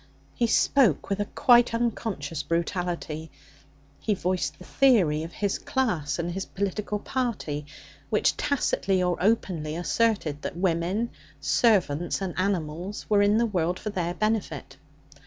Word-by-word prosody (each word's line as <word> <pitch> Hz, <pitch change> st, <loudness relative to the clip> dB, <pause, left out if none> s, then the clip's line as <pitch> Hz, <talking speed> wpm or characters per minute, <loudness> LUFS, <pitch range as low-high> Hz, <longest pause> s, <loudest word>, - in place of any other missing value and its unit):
He 235 Hz, -, +1 dB
spoke 225 Hz, -, +3 dB
with 195 Hz, -, 0 dB
a 205 Hz, -, 0 dB
quite 240 Hz, 0 st, +4 dB
unconscious 205 Hz, -10 st, -2 dB
brutality; 170 Hz, -1 st, -2 dB, 0.7 s
he 210 Hz, -, 0 dB
voiced 185 Hz, 0 st, -1 dB
the 180 Hz, -, -13 dB
theory 195 Hz, -, +3 dB
of 165 Hz, +2 st, -6 dB
his 200 Hz, -2 st, -1 dB
class 175 Hz, -, -1 dB
and 170 Hz, +1 st, -2 dB
his 190 Hz, +2 st, -3 dB
political 200 Hz, +2 st, -2 dB
party, 205 Hz, -, -3 dB, 0.4 s
which -, -, +2 dB
tacitly 195 Hz, -9 st, +1 dB
or 180 Hz, -1 st, +1 dB
openly 180 Hz, -7 st, 0 dB
asserted 175 Hz, -5 st, 0 dB
that -, -, -5 dB
woman, 185 Hz, +5 st, 0 dB, 0.3 s
servants, 160 Hz, -, +2 dB
and 190 Hz, -3 st, -3 dB
animals 185 Hz, 0 st, -2 dB
were 205 Hz, -1 st, +4 dB
in 205 Hz, +1 st, +4 dB
the 235 Hz, -, +3 dB
world 180 Hz, -5 st, 0 dB
for 210 Hz, -, -5 dB
their 175 Hz, -3 st, -2 dB
benefit. 215 Hz, -9 st, -2 dB
185 Hz, 140 wpm, -26 LUFS, 165-215 Hz, 0.7 s, quite